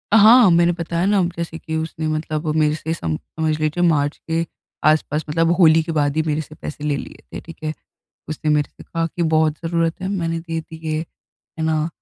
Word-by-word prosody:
हाँ, 220 +1 +8
मैंने 170 +1 +4
बताया 170 0 -2
न 195 -3 +3
जैसे 165 -1 -4
कि 160 -1 -5
उसने 160 0 -3
मतलब 155 0 -2
मेरे 155 -1 +3
से 160 +1 -3
सम 80 - -2
समझ 155 -1 -3
लीजिए 155 +3 0
मार्च 145 -2 +1
के 165 +1 +1 0.4
आसपास 155 0 +1
मतलब 165 +2 +2
होली 160 -2 +6
के 165 - -4
बाद 145 -2 +1
ही - - +4
मेरे 155 0 0
से 155 0 -12
पैसे 150 -1 -7
ले 150 -1 +1
लिए - - -9
थे, - - -4
ठीक 165 - -12
है। 155 0 -1 0.6
उसने 155 0 -2
मेरे 150 -1 +2
से - - -12
कहा 165 -1 -2
की 170 +1 -4
बहुत 160 -1 +2
ज़रूरत 165 0 0
है, 185 - -3
मैंने 165 -4 -1
दे 165 -1 -4
दिए। 160 -1 -5
है 160 0 -10
ना? 160 0 +1
160 Hz, 210 wpm, -21 LUFS, 155-165 Hz, 0.6 s, हाँ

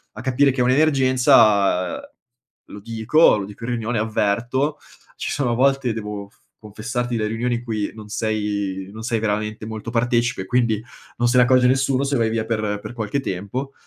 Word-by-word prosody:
a 110 - -7
capire 135 +3 +2
che 130 -1 -2
è - - +4
un'emergenza 130 - +3 0.7
lo 105 - -10
dico 115 +6 +3
lo 100 - -4
dico 105 +3 -12
in 125 - -3
riunione, 115 -1 -2
avverto, 120 +7 0 0.4
ci - - -3
sono 125 -5 0
volte 135 -1 +2
devo 105 -2 -6
f - - -31 0.3
confessarti 115 +3 -3
le 110 - -1
riunioni 120 +2 -1
in 120 - -5
cui 110 -3 -3
non 110 -1 -10
sei 105 -3 -2
non 110 - -8
sei 115 -2 -1
veramente 105 0 -2
molto 110 +1 -6
partecipe, 120 -3 0
quindi 115 -1 +1 0.4
non 120 - +2
se 125 +1 +2
ne 125 - +7
accorge 125 0 +4
nessuno 135 +1 +2
se 140 - 0
vai 115 -1 +1
via 110 -1 -1
per 110 -2 -2
per - - -8
qualche 110 +3 -2
tempo, 125 +7 -4
115 Hz, 180 wpm, -21 LUFS, 105-125 Hz, 0.7 s, ne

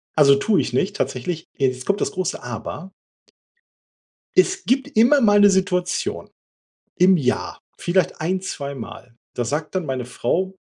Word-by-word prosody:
Also 140 -3 +6
tue 195 +10 +2
ich - - -4
nicht 200 +1 0
tatsächlich. 160 +6 -3
Jetzt 130 -2 -1
kommt 200 0 0
das - - 0
große 185 0 -3
Aber. 125 - -7 1.5
Es 375 +1 +3
gibt 270 +2 0
immer 250 +6 +5
mal 205 -2 +5
'ne 205 0 +7
Situation 185 -2 -1 0.7
im 185 +1 +5
Jahr 130 -5 -2 0.2
vielleicht 175 -2 0
ein, 185 +4 0
zweimal, 140 -8 -7 0.2
da 120 - -2
sagt 150 +8 -3
dann 185 -3 -1
meine 130 -3 -3
Frau: 185 +10 -2
180 Hz, 145 wpm, -21 LUFS, 140-200 Hz, 1.5 s, ne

